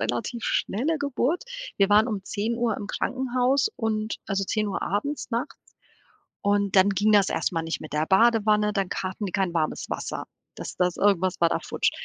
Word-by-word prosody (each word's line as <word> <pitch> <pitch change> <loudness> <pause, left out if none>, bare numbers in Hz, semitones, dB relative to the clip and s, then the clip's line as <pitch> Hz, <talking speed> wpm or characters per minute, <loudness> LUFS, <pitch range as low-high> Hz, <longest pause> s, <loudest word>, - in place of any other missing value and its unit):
relativ 235 +1 -2
schnelle 295 +10 0
Geburt. 285 - -1 0.3
Wir 195 - +4
waren 210 +2 +5
um 210 -4 -3
10:00 225 +2 -1
im 205 - -6
Krankenhaus 255 - +1
und 220 -2 -1
also, 195 -1 -1
10:00 210 0 -1
abends 255 +10 -2
nachts. 235 +1 -2 0.8
Und 200 -1 +1
dann 190 +1 +6
ging 205 +2 +2
das 200 -2 +5
erst - - -1
mal 165 -1 -1
nicht 165 0 -3
mit 155 - -9
der 150 +1 0
Badewanne, 210 0 +4
dann 195 -2 -1
k 185 - -2
hatten 195 +3 -5
die 185 - -6
kein 190 -3 0
warmes 155 -2 -1
Wasser. - - -4 0.3
Das - - -7
das 180 -1 +1
irgendwas 190 -3 +2
war 170 - +5
da - - 0
futsch. - - 0
210 Hz, 185 wpm, -25 LUFS, 195-235 Hz, 0.8 s, dann